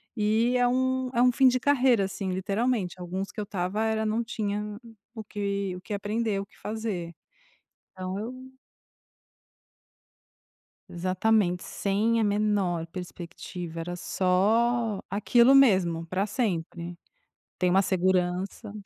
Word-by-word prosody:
e 220 +3 +2
é 245 0 +3
um 260 0 +1
é 240 - +2
um 250 - +6
fim 265 +2 +5
de 255 0 +3
carreira, 255 -6 +3
assim, 190 0 -4
literalmente, 200 0 -1
alguns 185 +2 -4
que - - -8
eu - - -1
estava 195 +2 -2
era 220 0 0
não 220 +2 0
tinha 210 -2 -3 0.4
o 220 - -6
que 200 -2 -3
o 180 - -9
que 210 - -6
aprender, 205 0 -1
o 200 - -4
que - - -25
fazer. 210 -6 -4 0.8
Então 185 +1 -4
eu 225 +5 -4 2.6
Exatamente, 185 +1 +1
sem 215 +4 0
a 225 - +2
menor 200 -5 +1
perspectiva, 175 -1 -7
era 175 +2 -4
só 215 +5 +1
aquilo 235 +6 +4
mesmo 185 -10 +4
pra 190 +4 -1
sempre. 175 -6 -2 0.6
Tem 180 - +1
uma 195 +1 +5
segurança 185 +2 0
200 Hz, 130 wpm, -27 LUFS, 185-225 Hz, 2.6 s, um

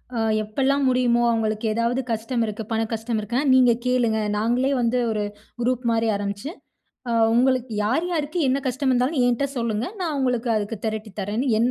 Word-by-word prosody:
அ 230 - -1 0.2
எப்போலாம் 270 +6 0
முடியுமோ, 245 -2 +2
அவங்களுக்கு 220 -1 0
ஏதாவது 235 +3 0
கஷ்டம் 230 +2 -1
இருக்கு. 215 +1 -5
பண 225 0 +1
கஷ்டம் 225 0 -2
இருக்குனா, 240 +7 -1
நீங்க 255 -2 +6
கேளுங்க 240 -3 +2 0.2
நாங்களே 245 +5 +1
வந்து 240 +1 +1
ஒரு 210 -1 -1 0.4
குரூப் 250 0 0
மாரி 230 0 +1
ஆரம்பிச்சு 200 +6 -4 0.6
அ - - 0 0.2
உங்களுக்கு 255 0 +2
யார், 260 +10 +1
யாருக்கு 310 0 -2
என்ன 265 +2 +2
கஷ்ட 260 +3 -3
இருந்தாலும் 255 +3 +1
என்கிட்ட 245 +3 +1
சொல்லுங்க, 230 -1 -1
நான் 325 -5 -1
உங்களுக்கு 250 -2 0
அதுக்கு 210 +2 -2
திரட்டித் 215 -2 -5
தரேன்ன்னு 215 +7 -2
என்ன. 240 +2 +2
240 Hz, 170 wpm, -23 LUFS, 220-255 Hz, 0.6 s, நீங்க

